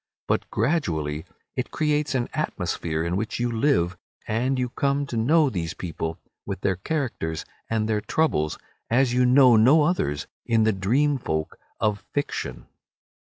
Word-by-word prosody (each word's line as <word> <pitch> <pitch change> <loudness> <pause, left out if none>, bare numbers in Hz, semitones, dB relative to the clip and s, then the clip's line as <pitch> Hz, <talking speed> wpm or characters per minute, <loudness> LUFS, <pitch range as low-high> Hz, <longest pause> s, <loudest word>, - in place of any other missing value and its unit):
But - - 0
gradually 85 - -1 0.3
it 125 - -2
creates 150 -2 0
an 120 -2 0
atmosphere 80 -1 -2
in 85 +1 -1
which 110 +3 -3
you 120 0 0
live, 95 - +1 0.3
and 125 +5 0
you 125 -1 0
come 140 +3 0
to 130 - -6
know 150 +8 +4
these 85 - -3
people, 80 -2 -4 0.3
with - - -5
their 95 - +1
characters 110 - -3 0.2
and 110 -1 0
their 105 -1 0
troubles, 75 - 0 0.3
as 125 +1 +3
you 125 0 +4
know 125 -1 +7
no 135 +8 +6
others 75 - 0 0.2
of 115 -1 +4
the 110 0 +3
dream 130 +10 +1
folk 80 -8 -3 0.2
of 105 -2 0
fiction. 145 - -3
115 Hz, 155 wpm, -25 LUFS, 90-140 Hz, 0.3 s, know